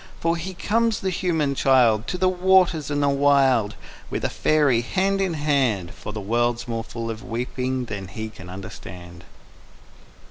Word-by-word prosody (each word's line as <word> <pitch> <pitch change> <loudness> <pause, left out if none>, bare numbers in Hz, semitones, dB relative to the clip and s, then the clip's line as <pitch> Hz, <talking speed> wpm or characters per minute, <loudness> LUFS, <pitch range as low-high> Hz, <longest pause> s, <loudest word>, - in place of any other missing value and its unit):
_For 165 0 +2
he 180 +3 -5
comes, 225 +3 +1
the 190 - -1
human 160 -6 0
child, 120 -5 +3
To 180 - -2
the 185 +1 +2
waters 185 -4 +3
and 145 0 0
the 140 - +3
wild 135 -6 +3 0.3
With - - -3
a - - -1
faery, 145 -6 +2
hand 195 +9 0
in 185 -4 0
hand, 135 - 0
From 105 - -8
a - - -2
world 120 +3 0
more 115 -1 -3
full 115 0 -5
of 110 0 -8
weeping 125 +2 -3
than 100 -4 -6
he 110 +5 -6
can 95 -4 -12
understand. 90 -2 -10
130 Hz, 170 wpm, -23 LUFS, 115-165 Hz, 0.3 s, child